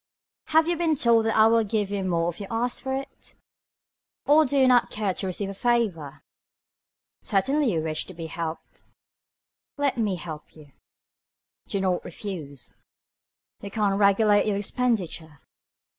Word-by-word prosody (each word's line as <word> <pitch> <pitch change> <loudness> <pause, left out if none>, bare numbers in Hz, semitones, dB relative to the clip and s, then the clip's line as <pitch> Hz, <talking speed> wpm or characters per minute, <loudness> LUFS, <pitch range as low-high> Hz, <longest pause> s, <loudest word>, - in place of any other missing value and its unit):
Have 320 +1 +3
you 345 - +1
been 325 -2 +1
told 235 -4 +3
that 225 - 0
I 215 - +7
will 225 0 +4
give 210 -1 -2
you 200 -1 -2
more 170 -2 0
if 175 - -12
you 200 - -6
ask 240 +2 -2
for 265 0 -2
it. 270 +1 -8 0.9
Or 305 +1 +5
do 280 - 0
you 265 -1 +5
not 245 -2 +4
care 210 -3 -2
to 190 - -1
receive 195 +2 -3
a - - -7
favor. 195 - -1 1.0
Certainly 270 +6 +1
you 160 -2 -1
wish 155 -1 -1
to 185 - -11
be 165 0 -6
helped. 165 0 -6 1.0
Let 280 -4 0
me 210 -4 0
help 160 -3 -9
you. 150 -3 -16 1.0
Do 200 - -2
not 185 -2 0
refuse 155 - -8 0.8
me. 205 - -7
You - - -5
can 205 -1 0
regulate 205 +1 +3
your 205 -2 0
expenditure. 195 - -2
205 Hz, 160 wpm, -25 LUFS, 175-240 Hz, 1.0 s, I